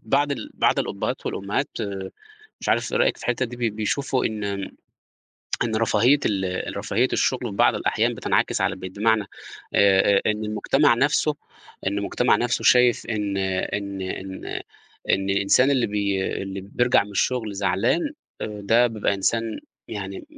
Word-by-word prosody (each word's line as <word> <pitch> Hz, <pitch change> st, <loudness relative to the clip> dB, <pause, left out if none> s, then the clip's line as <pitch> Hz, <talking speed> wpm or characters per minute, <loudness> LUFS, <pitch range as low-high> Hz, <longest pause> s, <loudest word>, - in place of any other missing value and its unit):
بعض 140 Hz, +5 st, +1 dB
ال 140 Hz, -, -6 dB
بعض -, -, +2 dB
الأبهات -, -, -3 dB
والأمهات -, -, -2 dB, 0.9 s
مش -, -, -5 dB
عارف -, -, +1 dB
إيه 480 Hz, -, +1 dB
رأيِك -, -, +2 dB
في -, -, -13 dB
الحتة 120 Hz, +1 st, 0 dB
دي 120 Hz, +1 st, -9 dB
ب 105 Hz, -, -13 dB
بيشوفوا 130 Hz, +5 st, 0 dB
إن 110 Hz, -1 st, -4 dB, 1.2 s
إن 110 Hz, -2 st, -1 dB
رفاهية 120 Hz, +5 st, +3 dB
ال 95 Hz, -2 st, -2 dB
رفاهية 105 Hz, +5 st, +1 dB
الشغل 130 Hz, -, +1 dB
في 100 Hz, -, -8 dB
بعض -, -, +4 dB
الأحيان -, -, 0 dB
بتنعكس -, -, 0 dB
على -, -, +1 dB
البيت، 95 Hz, 0 st, -8 dB
بمعنى 110 Hz, 0 st, +3 dB, 0.5 s
آآ 100 Hz, 0 st, +5 dB
آآ، -, -, +4 dB
إن 105 Hz, 0 st, 0 dB
المجتمع 105 Hz, 0 st, +2 dB
نفسُه -, -, +2 dB, 0.5 s
إن 100 Hz, +1 st, 0 dB
المجتمع 100 Hz, +5 st, +2 dB
نفسُه 120 Hz, 0 st, -1 dB
شايف 125 Hz, -1 st, +5 dB
إن 105 Hz, -3 st, -2 dB
إن 95 Hz, +1 st, -2 dB
إن 95 Hz, 0 st, -6 dB, 0.7 s
إن 95 Hz, +1 st, +1 dB
الإنسان 100 Hz, +7 st, +3 dB
اللي 130 Hz, -4 st, +2 dB
بي 100 Hz, -2 st, -1 dB, 0.2 s
اللي 95 Hz, 0 st, -5 dB
بيرجع 120 Hz, +4 st, +2 dB
من 105 Hz, -, -12 dB
الشغل 110 Hz, +2 st, 0 dB
زعلان 95 Hz, -, +1 dB, 0.4 s
آآ 105 Hz, -1 st, -5 dB
ده 115 Hz, +4 st, +5 dB
بيبقى 110 Hz, -3 st, -1 dB
إنسان 115 Hz, +4 st, -1 dB, 0.3 s
يعني 360 Hz, -, -6 dB
105 Hz, 155 wpm, -24 LUFS, 100-120 Hz, 1.2 s, آآ